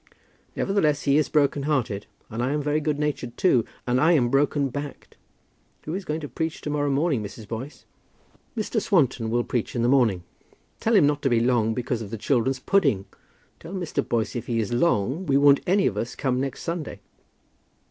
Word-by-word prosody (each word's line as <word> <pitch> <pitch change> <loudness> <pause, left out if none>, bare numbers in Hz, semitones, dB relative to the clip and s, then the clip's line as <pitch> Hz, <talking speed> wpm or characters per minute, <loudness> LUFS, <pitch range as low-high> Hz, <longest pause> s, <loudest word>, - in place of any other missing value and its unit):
"Nevertheless 155 -8 +1
he 140 0 +3
is 155 - 0
broken 145 -1 +2
hearted; 130 -9 -1 0.2
and 115 +2 -3
I 130 +3 0
am 150 - 0
very 150 +1 +1
good 150 -1 -1
natured 145 -5 -3
too, 125 - +3 0.2
and 125 +1 +1
I 165 +3 +5
am 125 -7 +3
broken 140 +1 +2
backed. 145 +2 -7 0.7
Who 155 - -5
is 190 +1 -4
going 155 0 -3
to 145 - -5
preach 160 +5 -3
to 150 - -4
morrow 145 -1 0
morning, 140 -2 +1
Mrs. 105 +1 -8
Boyce?" 120 +7 -7 0.7
"Mr. 220 +1 -1
Swanton 130 - +1
will 120 +1 +1
preach 120 0 -3
in 120 - 0
the - - +3
morning." 120 -9 +3 0.6
"Tell 225 +1 +2
him 185 -8 +6
not 145 0 +1
to 135 - +1
be 120 -2 +3
long, 115 -2 +2
because 120 -1 -2
of 105 - -6
the 115 - -5
children's 130 +3 +1
pudding. 125 - +1 0.5
Tell 165 +3 -10
Mr. 170 -6 -2
Boyce 115 -1 -1
if 120 - -4
he 115 -2 0
is 110 +1 -2
long, 135 - +1
we 135 -1 +3
won't 140 0 +6
any 195 +2 +3
of - - 0
us 115 - -3
come 130 -2 0
next 135 -1 -4
Sunday." 165 -3 -4
140 Hz, 200 wpm, -25 LUFS, 120-150 Hz, 0.7 s, him